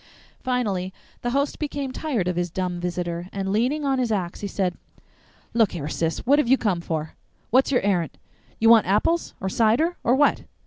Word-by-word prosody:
Finally, 205 -8 -1 0.3
the 240 - -1
host 280 +3 0
became 285 -3 -3
tired 255 - -2
of 180 - 0
his 175 0 -1
dumb 180 0 -3
visitor, 175 0 -3
and 195 -1 -3
leaning 255 +8 +1
on 270 -1 +1
his 245 -3 0
axe 185 -4 -2
he 205 - -4
said, 185 -3 -1 0.8
"Look 225 -4 +3
here, 155 -5 -4
Sis, 165 +1 -2
what 285 +4 +5
have 300 - +1
you 265 +2 +5
come 195 -8 0
for? 160 -2 -3 0.4
What's 260 +3 +4
your 250 - +3
errant? 180 -6 0
Do - - -28 0.4
you 225 - +4
want 225 -4 +6
apples? 270 - +1
Or 190 - -3
cider? 235 - +2
Or 245 - +3
what? 290 +1 +3
210 Hz, 195 wpm, -24 LUFS, 180-260 Hz, 0.8 s, want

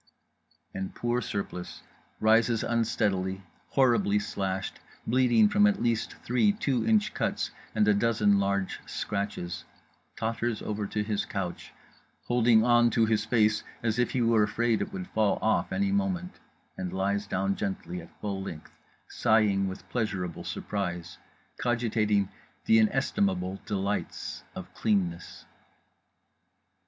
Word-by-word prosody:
_" - - -45 0.7
and 95 0 -5
poor 120 +1 0
Surplice 95 -5 -5 0.4
rises 115 +1 +3
unsteadily, 95 -5 0 0.3
horribly 120 -6 +3
slashed, 95 -2 -3 0.3
bleeding 130 - +4
from 205 0 +4
at 205 -1 +1
least 115 -2 0
three 125 - +3
two 140 - 0
inch 110 -2 +3
cuts - - -1 0.2
and 105 - +3
a 105 - +6
dozen 105 -1 +3
large 100 -1 -1
scratches; 100 -4 -3 0.5
totters 115 0 -1
over 105 -1 -3
to 105 +1 -1
his 105 -1 -1
couch 95 -3 -5 0.5
holding 120 -2 +4
on 120 0 +5
to 115 -1 +3
his 110 -1 +1
face 110 -2 +2 0.2
as 115 +1 0
if 125 - +2
he 125 - 0
were 115 -1 +4
afraid 115 +2 +1
it 195 - -3
would 185 -1 -5
fall 110 -2 +2
off 110 0 +1
any 195 0 +1
moment; 190 -2 -1 0.4
and 90 -1 -4
lies 100 +2 -1
down 95 0 0
gently 95 -3 -4
at 85 - -13
full 100 -2 -3
length, 80 -5 -8 0.4
sighing 105 -3 +2
with 95 0 -7
pleasurable 100 -7 -2
surprise, 90 -4 -4 0.4
cogitating 110 -4 +1 0.4
the 110 - +6
inestimable 100 -5 +1
delights 100 0 -3
of - - -8
cleanness…. 90 -5 -1
105 Hz, 130 wpm, -28 LUFS, 100-120 Hz, 0.7 s, a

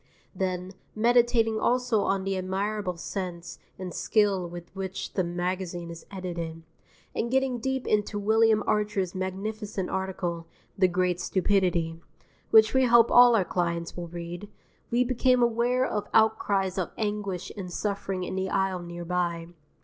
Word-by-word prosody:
_" - - -38 0.3
Then, 185 -1 -2 0.2
meditating 230 -1 +3
also 245 -3 +2
on 195 -1 0
the 195 0 -1
admirable 190 0 -2
sense 175 -1 -5 0.2
and 185 -1 -6
skill 200 -5 +1
with 175 +1 -10
which 190 0 -5
the 185 - +1
magazine 175 0 -3
is 170 - -11
edited, 170 -4 -5 0.5
and 235 - -2
getting 265 -1 +1
deep 265 +2 -2
into 210 0 0
William 220 +1 +3
Archer's 210 -4 0
magnificent 195 +1 -4
article 180 -3 -3 0.3
"The 190 -1 +4
Great 180 0 0
Stupidity" 175 -5 +1 0.5
(which 220 0 +6
we 260 0 +4
hope 235 -1 +5
all 245 -1 +8
our 195 -5 +2
clients 170 -2 -2
will 175 -1 -5
read) 175 +3 -7 0.4
we 240 +1 +3
became 250 0 +3
aware 240 +2 +2
of 210 -5 -2
outcries 200 -4 +2
of 180 - -1
anguish 205 -4 -3
and 185 -3 -6
suffering 195 -1 -2
in - - -4
the 190 0 -2
aisle 190 -1 0
near 175 0 -7
by. 170 -1 -1
190 Hz, 150 wpm, -27 LUFS, 180-220 Hz, 0.5 s, all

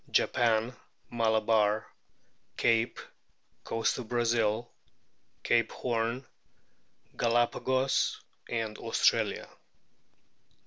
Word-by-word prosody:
Japan, 115 0 +2 0.4
Malabar, 110 -2 +2 0.7
Cape, 115 0 +1 0.6
Coast 115 +3 -1
of 120 - -7
Brazil, 115 -1 +1 0.8
Cape 115 -1 +2
Horn, 120 +2 -2 0.9
Galapagos, 120 +3 +1 0.3
Australia. 110 -2 0
115 Hz, 55 wpm, -29 LUFS, 110-120 Hz, 0.9 s, Japan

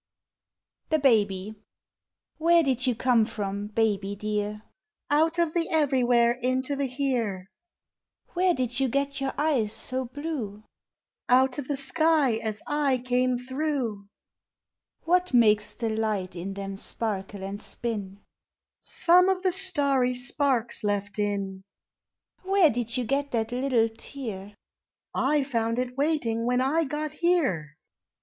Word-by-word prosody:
THE 315 - +3
BABY. 210 -7 +2 0.9
Where 335 +1 +5
did 260 -2 0
you 250 - +2
come 240 -1 +3
from, 205 -1 -4
baby 205 -2 0
dear? 210 +1 -3 0.5
Out 320 +3 +3
of 335 -2 +1
the 335 -1 0
everywhere 250 -6 +3
into 255 +3 0
the 280 0 -1
here. 245 -8 -2 0.9
Where 360 0 +2
did 250 -1 -2
you 270 - +2
get 280 +2 -1
your 270 -1 0
eyes 275 -8 +1
so 260 +2 -3
blue? 255 -6 -5 0.7
Out 260 +2 +4
of 265 - -5
the 285 - -1
sky 295 -3 +2
as 220 -2 -4
I 290 -3 +1
came 250 0 +1
through. 255 -5 -3 1.0
Wfhat 360 -4 +2
makes 210 -3 +4
the 230 -2 -2
light 215 -5 -2
in 190 +3 -5
them 195 -1 -5
sparkle 200 -2 -3
and 200 +2 -5
spin? 205 -5 -5 0.6
Some 360 +2 +4
of 380 -1 0
the 370 - +3
starry 285 -9 +2
spikes 250 -2 0
left 205 0 -2
in. 200 -2 -2 0.8
Where 375 -4 +4
did 240 +1 -3
you 250 - 0
get 280 +4 -1
that 225 0 -1
little 250 -2 +2
tear? 220 -4 -8 0.4
/ - - -66
found 260 -5 0
it 250 0 -2
waiting 265 -6 0
when 250 0 +2
I 300 +6 +2
got 300 +2 -3
here. 280 - 0
250 Hz, 135 wpm, -26 LUFS, 215-285 Hz, 1.0 s, Where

